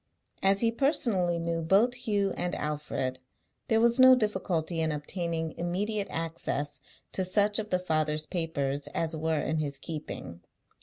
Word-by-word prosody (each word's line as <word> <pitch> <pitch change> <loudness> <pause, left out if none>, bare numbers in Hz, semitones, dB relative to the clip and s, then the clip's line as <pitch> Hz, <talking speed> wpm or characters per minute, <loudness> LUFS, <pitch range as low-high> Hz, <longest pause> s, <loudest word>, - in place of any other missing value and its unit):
As 195 +1 +4
he 230 -1 +3
personally 230 - +1
knew 165 0 -1
both 200 +9 +4
Hugh 205 -5 0
and 180 - -2
Alfred, 145 -4 -3 0.5
there 225 - +3
was 235 +2 +3
no 255 0 +9
difficulty 185 -7 0
in 160 -1 +1
obtaining 165 +2 -2
immediate 200 +4 -1
access 155 -4 -3 0.3
to 190 - 0
such 205 +3 +2
of 215 -1 -4
the 180 - +2
father's 155 -3 0
papers 145 -6 -2
as 165 0 -1
were 160 0 0
in 160 0 0
his 145 -2 -2
keeping. 140 - -7
170 Hz, 150 wpm, -29 LUFS, 155-205 Hz, 0.5 s, no